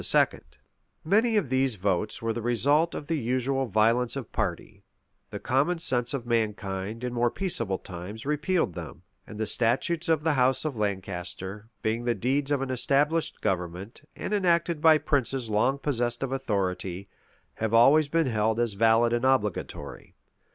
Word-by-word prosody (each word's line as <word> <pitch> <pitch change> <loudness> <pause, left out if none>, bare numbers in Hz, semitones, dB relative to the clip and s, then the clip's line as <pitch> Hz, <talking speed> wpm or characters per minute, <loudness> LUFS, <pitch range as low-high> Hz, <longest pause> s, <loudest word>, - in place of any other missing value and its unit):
[] - - -44
Many 220 +6 +3
of 165 -11 0
these 130 -2 +2
votes 100 +3 -1
were 115 0 0
the 120 - -4
result 145 +8 +2
of - - -5
the 160 0 -1
usual 130 +2 0
violence 115 +4 +2
of 135 -5 -6
party: - - -4 0.5
the - - -6
common 145 +7 +1
sense 125 -6 0
of 125 -3 -5
mankind, 110 -2 -2
in 125 -1 -3
more 120 0 +2
peaceable 115 - -1
times, 95 +6 -8
repealed 150 - 0
them: 85 +1 -9 0.2
and 105 - -9
the 110 - 0
statutes 130 +10 0
of 160 -2 +2
the 160 -1 +2
house 130 +2 +2
of 150 -4 -2
Lancaster, 100 0 -4
being 110 +2 -1
the 120 -1 +1
deeds 135 +7 0
of 140 -2 +1
an 130 - -4
established 145 +5 +1
government, 95 +3 -3
and - - -4
enacted 170 -5 +1
by 160 -1 +7
princes 135 -5 -1
long 125 +6 +2
possessed 120 -4 -2
of 135 - -3
authority, 95 -6 -2 0.5
have 110 -1 -3
always 135 +7 +5
been 165 +3 +1
held 110 -2 0
as 120 -3 0
valid 115 +3 +3
and 120 +1 0
obligatory. 130 -7 -2
120 Hz, 165 wpm, -27 LUFS, 105-145 Hz, 0.5 s, by